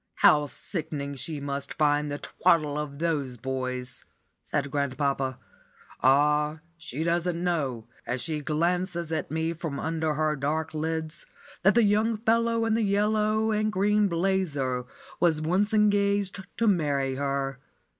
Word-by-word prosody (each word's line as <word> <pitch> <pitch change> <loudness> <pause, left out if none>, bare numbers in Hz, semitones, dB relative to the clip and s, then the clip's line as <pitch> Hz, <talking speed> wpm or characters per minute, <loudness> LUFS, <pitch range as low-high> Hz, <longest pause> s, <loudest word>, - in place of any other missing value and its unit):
How 150 -1 +5
sickening 150 -4 -4
she 145 +2 -4
must 140 -1 -4
find 150 -1 +2
the 145 - -2
twaddle 155 -3 +1
of 150 -1 -4
those 145 -6 -1
boys!" 130 0 -4 0.4
said 140 -1 -2
grandpapa. 140 -2 -1 0.6
"Ah, 150 +3 +3
she 160 -2 -5
doesn't 170 +1 0
know, 140 -10 -1 0.2
as 125 +2 -1
she 155 +3 -2
glances 170 +2 0
at 160 - -2
me 160 +1 -1
from 160 -4 -5
under 160 -1 -1
her 155 0 +1
dark 155 +3 -2
lids, 160 0 -3 0.3
that 195 +4 +4
the 235 - +5
young 215 +2 +2
fellow 230 +1 +2
in 225 - +1
the 225 - +2
yellow 215 +1 +2
and 215 0 +1
green 210 +1 +3
'blazer' 165 -9 0 0.3
was 165 -3 +3
once 185 +7 +1
engaged 200 -2 +2
to 230 - +1
marry 140 -8 +1
her. 135 -1 -2
160 Hz, 140 wpm, -27 LUFS, 140-190 Hz, 0.6 s, How